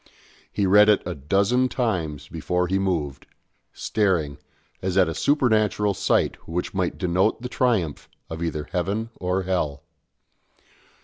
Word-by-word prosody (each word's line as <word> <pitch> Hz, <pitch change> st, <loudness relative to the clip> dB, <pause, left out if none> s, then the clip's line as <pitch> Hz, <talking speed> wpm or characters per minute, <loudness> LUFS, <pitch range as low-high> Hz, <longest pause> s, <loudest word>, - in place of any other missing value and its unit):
He 100 Hz, -, 0 dB
read 105 Hz, +3 st, +6 dB
it 105 Hz, -, +4 dB
a 90 Hz, -, -3 dB
dozen 100 Hz, -, +1 dB
times 80 Hz, -, -2 dB
before 90 Hz, +3 st, -1 dB
he 95 Hz, +2 st, 0 dB
moved, 80 Hz, -8 st, -2 dB, 0.4 s
staring, 85 Hz, -9 st, 0 dB, 0.4 s
as 95 Hz, 0 st, -1 dB
at 95 Hz, -2 st, +5 dB
a 80 Hz, -, -2 dB
supernatural 110 Hz, -, +2 dB
sight -, -, 0 dB
which 85 Hz, +2 st, -3 dB
might 95 Hz, -2 st, -1 dB
denote 95 Hz, +6 st, +1 dB
the 125 Hz, -, -4 dB
triumph 110 Hz, -, 0 dB, 0.2 s
of 80 Hz, 0 st, -7 dB
either 80 Hz, -2 st, -3 dB
heaven 100 Hz, +5 st, -2 dB
or 90 Hz, +1 st, -1 dB
hell. 80 Hz, -7 st, -2 dB
95 Hz, 135 wpm, -24 LUFS, 80-105 Hz, 0.4 s, read